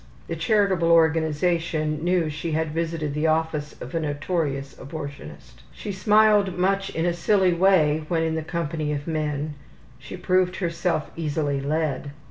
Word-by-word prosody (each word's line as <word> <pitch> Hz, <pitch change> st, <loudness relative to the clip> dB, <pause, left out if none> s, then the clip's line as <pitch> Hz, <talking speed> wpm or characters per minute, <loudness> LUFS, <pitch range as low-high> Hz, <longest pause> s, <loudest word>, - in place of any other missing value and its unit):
(The 165 Hz, -, -3 dB
charitable 190 Hz, -1 st, +2 dB
organization 160 Hz, -1 st, +2 dB
knew 175 Hz, -2 st, +2 dB
she 155 Hz, +2 st, -4 dB
had 160 Hz, 0 st, 0 dB
visited 160 Hz, -2 st, -2 dB
the 150 Hz, +2 st, 0 dB
office 155 Hz, -2 st, -1 dB
of 125 Hz, -, -8 dB
a 165 Hz, -, 0 dB
notorious 145 Hz, -2 st, -2 dB
abortionist.) 140 Hz, -, -9 dB
She 205 Hz, -, -6 dB
smiled 205 Hz, 0 st, +3 dB
much 195 Hz, +2 st, +1 dB
in 165 Hz, -, -2 dB
a 175 Hz, -, +2 dB
silly 185 Hz, +1 st, +2 dB
way 165 Hz, -4 st, +3 dB
when 165 Hz, -1 st, 0 dB
in 160 Hz, 0 st, 0 dB
the 160 Hz, -, -1 dB
company 155 Hz, -2 st, -3 dB
of 145 Hz, 0 st, -4 dB
men; 150 Hz, -2 st, -2 dB, 0.5 s
she 140 Hz, +7 st, -9 dB
proved 185 Hz, 0 st, +1 dB
herself 170 Hz, -2 st, -1 dB
easily 145 Hz, -3 st, -1 dB
led. 145 Hz, -1 st, -2 dB
160 Hz, 150 wpm, -24 LUFS, 150-180 Hz, 0.5 s, smiled